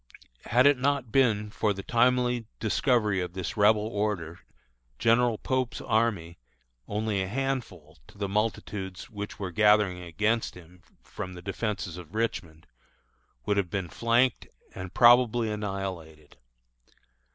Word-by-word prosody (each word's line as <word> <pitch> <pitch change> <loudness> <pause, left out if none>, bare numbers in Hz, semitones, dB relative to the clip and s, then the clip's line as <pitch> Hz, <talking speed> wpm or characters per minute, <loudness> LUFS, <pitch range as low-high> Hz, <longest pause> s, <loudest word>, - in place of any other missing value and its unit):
Had 125 +3 +3
it 145 -2 +5
not 135 -3 0
been 105 -5 +2
for 105 -1 0
the 100 0 -7
timely 125 -1 +2
discovery 110 -2 +1
of 90 -1 -5
this 90 -1 -4
Rebel 105 0 +4
order, 100 -6 -3 0.6
General 115 0 +3
Pope's 130 +1 -2
army, 105 -7 -1 0.5
only 105 -1 -1
a 95 - -2
handful 110 - -4
to - - -18
the 100 -1 -2
multitudes 100 -2 -3
which 105 -1 -6
were 95 -3 -5
gathering 105 -2 +3
against 110 +7 -1
him 90 0 -15 0.2
from 95 - -7
the 90 - -9
defences 100 -4 -3
of 90 +2 -11
Richmond, 85 -8 -3 0.8
would 105 - +1
have 95 -3 0
been 95 -1 -3
flanked 120 +2 +1 0.3
and 95 -1 -7
probably 120 -1 +5
annihilated. 95 -7 -6
105 Hz, 130 wpm, -27 LUFS, 90-115 Hz, 0.8 s, it